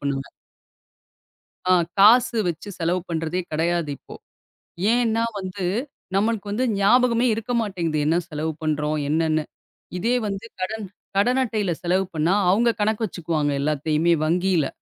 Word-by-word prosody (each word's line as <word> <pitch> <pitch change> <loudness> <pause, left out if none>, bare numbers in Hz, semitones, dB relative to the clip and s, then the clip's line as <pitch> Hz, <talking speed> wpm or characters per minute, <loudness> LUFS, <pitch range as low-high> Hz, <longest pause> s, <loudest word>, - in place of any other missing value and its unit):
பண்ணுவேன். 140 -1 -3 1.4
அ - - +7 0.3
காசு 235 +4 +6
வச்சு 175 +5 -5
செலவு 175 +2 0
பண்றதே 165 +1 -2
கெடையாது 165 0 0
இப்போ. - - -13 0.8
ஏன்னா 230 -2 +2 0.2
வந்து 185 0 -5 0.5
நம்மளுக்கு 210 0 0
வந்து 225 +5 0
ஞாபகமே 240 +4 +4
இருக்க 225 +2 -4
மாட்டேங்குது, 175 -8 -2
என்ன 160 - +3
செலவு 155 0 -3
பண்றோம் 150 0 0
என்னன்னு. 155 0 +1 0.5
இதே 235 +7 +1
வந்து 200 +1 -4 0.2
கடன் 210 +2 -3 0.3
கடன் 245 +6 +3
அட்டையில 215 -6 -1
செலவு 185 +2 +1
பண்ணா, 160 +3 +1 0.2
அவங்க 230 +5 +3
கணக்கு 220 +1 +1
வச்சுக்குவாங்க 160 -5 -2
எல்லாத்தையுமே 155 +3 +1
வங்கியில. 175 -2 +1
185 Hz, 125 wpm, -23 LUFS, 160-215 Hz, 1.4 s, அ